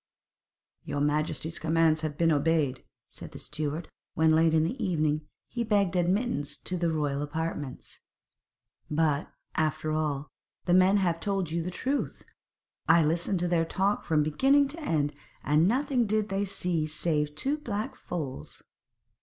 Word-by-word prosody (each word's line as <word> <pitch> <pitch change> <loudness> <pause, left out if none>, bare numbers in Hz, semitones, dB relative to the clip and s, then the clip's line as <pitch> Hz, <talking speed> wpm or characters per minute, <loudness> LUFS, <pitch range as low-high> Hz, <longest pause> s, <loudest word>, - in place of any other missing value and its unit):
'Your 145 - -3
majesty's 155 +2 0
commands 160 -1 +2
have 155 -2 -3
been 165 -1 +3
obeyed,' 150 -3 +1 0.2
said - - -10
the - - -8
steward 150 +2 -4 0.3
when, 160 0 +4
late 160 +1 +4
in 155 - +4
the 230 +9 -2
evening, 155 -5 0 0.2
he 240 - -3
begged 200 -5 +1
admittance 175 - 0
to 185 - -3
the 170 -1 0
royal 145 -3 -1
apartments; 150 -2 -5 0.9
'but, 150 -1 +1 0.2
after 155 0 0
all, 150 -2 -1 0.4
the 175 - +2
men 185 +2 +5
have 175 -4 +1
told 195 -3 -1
you 170 +1 0
the 170 - -3
truth. 265 +10 -2 0.7
I 165 -1 +6
listened 170 +4 0
to 175 - +1
their 170 -1 +2
talk 195 +5 0
from 155 -2 +2
beginning 270 - +3
to 310 +4 -6
end, 150 - 0 0.3
and 150 +4 +3
nothing 250 0 +1
did 215 0 0
they 195 +1 0
see 175 -5 -1
save 150 -1 0
two 280 - -1
black 215 -6 -4
foals.' 145 -7 -6
165 Hz, 155 wpm, -28 LUFS, 150-195 Hz, 0.9 s, I